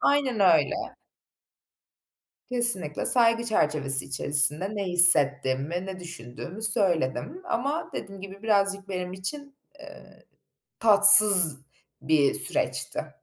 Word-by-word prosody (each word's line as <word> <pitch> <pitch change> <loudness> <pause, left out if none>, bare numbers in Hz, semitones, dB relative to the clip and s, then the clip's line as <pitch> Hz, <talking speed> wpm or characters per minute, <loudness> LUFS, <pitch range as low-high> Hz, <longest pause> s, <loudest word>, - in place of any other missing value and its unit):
Aynen 275 -6 -3
öyle. 195 - 0 1.8
Kesinlikle 235 -11 +1
saygı 230 -1 +1
çerçevesi 150 -10 -1
içerisinde 145 +8 -1
ne 200 - -6
hissettiğimi, 155 -2 0
ne 190 -1 -11
düşündüğümü 175 - -12
söyledim 195 - +3
ama 280 +7 -6
dediğim 195 -1 -11
gibi 195 +2 -14
birazcık 200 -2 -3
benim 180 -1 -8
için, 280 +10 -10 0.2
eee, 290 0 -18 0.5
tatsız 200 -7 +5 0.4
bir 150 -3 -2
süreçti. - - -4
190 Hz, 95 wpm, -22 LUFS, 155-220 Hz, 1.8 s, tatsız